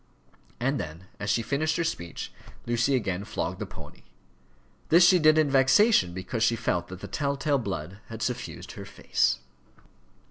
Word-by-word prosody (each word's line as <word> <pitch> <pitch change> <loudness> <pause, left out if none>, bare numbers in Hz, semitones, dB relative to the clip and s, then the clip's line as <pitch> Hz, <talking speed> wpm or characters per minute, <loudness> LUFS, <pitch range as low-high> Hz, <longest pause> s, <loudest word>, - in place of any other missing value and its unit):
And 135 +4 0
then 80 +4 -7
as 105 - -3
she 115 - +2
finished 155 +6 0
her 170 - +1
speech, 85 - -4 0.3
Lucy 120 +3 +1
again 100 -6 -1
flogged 105 - -4
the - - -4
pony. - - -12 0.9
This 175 +2 +7
she 180 0 +6
did 155 0 +5
in 155 -1 +4
vexation, 135 - +5
because 95 +6 -4
she 115 +1 +3
felt 85 -5 -1
that 95 0 -9
the - - -6
tell 140 -1 -1
tale 140 0 +1
blood 95 -3 -5
had 115 -1 -6
suffused 120 - -4
her - - -9
face. 65 - 0
120 Hz, 170 wpm, -27 LUFS, 95-140 Hz, 0.9 s, This